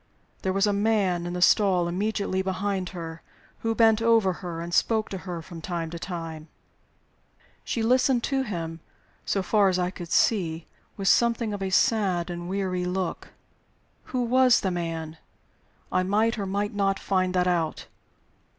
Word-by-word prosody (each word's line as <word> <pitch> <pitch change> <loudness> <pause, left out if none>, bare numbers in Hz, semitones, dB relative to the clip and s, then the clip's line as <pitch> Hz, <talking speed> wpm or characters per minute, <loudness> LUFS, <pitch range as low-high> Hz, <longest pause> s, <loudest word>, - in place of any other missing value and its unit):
There 190 - 0
was 195 +2 +2
a 205 - +1
man 200 -4 +1
in 175 - -4
the 180 0 +1
stall 185 -3 +4
immediately 195 +1 -1
behind 190 0 -2
her, 165 -3 -7 0.4
who 225 0 -1
bent 225 -1 +4
over 225 -5 +4
her 175 -3 -5
and 170 +1 -6
spoke 220 +4 +2
to 190 - -5
her 170 -2 -4
from 170 -1 -10
time 165 -1 -4
to 170 - -6
time. 165 -3 -6 1.2
She 230 - -2
listened 250 +1 +3
to 270 -1 0
him, 165 -9 -4 0.5
so 195 - 0
far 200 +1 +3
as 185 - 0
I 180 0 0
could 175 -3 -8
see, 170 -7 +2 0.3
with 195 -1 -3
something 235 -1 +3
of 200 - -5
a 190 - -1
sad 190 -3 +2
and 175 0 -6
weary 185 -2 -1
look. 180 -1 -3 0.8
Who 255 -1 -2
was 250 +1 +4
the 190 - 0
man? 165 -2 -4 0.7
I 185 - +2
might, 215 +5 +1
or 200 - -2
might 205 +2 -2
not, 195 -1 +1
find 185 -1 0
that 180 0 +3
out. 170 -3 -1
190 Hz, 170 wpm, -26 LUFS, 175-210 Hz, 1.2 s, stall